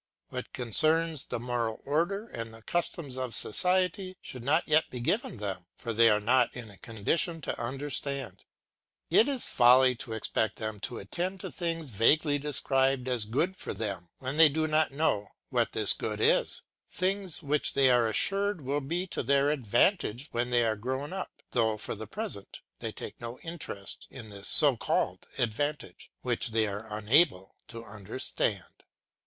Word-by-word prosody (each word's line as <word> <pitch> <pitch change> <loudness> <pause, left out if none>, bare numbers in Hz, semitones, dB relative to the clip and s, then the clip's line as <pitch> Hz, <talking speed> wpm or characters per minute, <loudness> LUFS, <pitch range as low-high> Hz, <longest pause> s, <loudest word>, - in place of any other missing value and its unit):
What - - -6
concerns 155 +5 0
the - - -4
moral 120 -2 -2
order 175 +9 0
and 115 - -6
the 115 0 -14
customs 155 -5 -2
of 130 -2 0
society 185 - +1
should 125 -2 -9
not 155 +6 +2
yet 155 0 +3
be 125 - -6
given 135 - -1
them, 95 -4 -5
for 115 - -5
they 115 +1 +6
are 105 -1 +3
not 120 +3 +3
in 115 -4 -8
a 100 - -15
condition 160 - -1
to - - -4
understand 140 +1 -3 0.7
it. - - 0
It 225 - +5
is 275 -4 +2
folly 125 +1 +5
to 115 0 -5
expect 110 -1 -1
them 110 -1 -5
to 120 - -7
attend 175 - -4
to - - -6
things 165 -6 -3
vaguely 145 +7 +3
described 135 -2 +1
as 125 -4 0
good 145 - 0
for - - -6
them, 95 -5 -4
when 135 +3 -5
they 160 -1 +8
do 155 +2 0
not 155 -1 +2
know 135 -8 0 0.2
what - - +1
this - - +4
good - - -4
is, - - +4 0.3
things 185 -2 -1
which 150 +1 +1
they 135 -2 +5
are 120 -2 +4
assured 200 - +1
will 140 +2 -1
be 170 +7 -2
to 185 - -4
their 140 +2 +2
advantage 130 - +1
when 120 +1 -1
they 120 -1 +3
are 110 -1 +1
grown 130 - -4
up, 190 -1 -7
though 110 -3 +1
for - - -3
the 110 0 -8
present 205 - -6 0.2
they - - -4
take - - -9
no 120 +1 -6
interest 155 -12 -6
in 115 -5 -10
this 100 -1 -4
so 145 -4 +6
called - - -1
advantage, 125 -3 -3
which - - 0
they 110 -1 +1
are 105 +2 -6
unable 105 - +2
to 115 0 -9
understand. 105 -2 -2
130 Hz, 175 wpm, -29 LUFS, 110-160 Hz, 0.7 s, they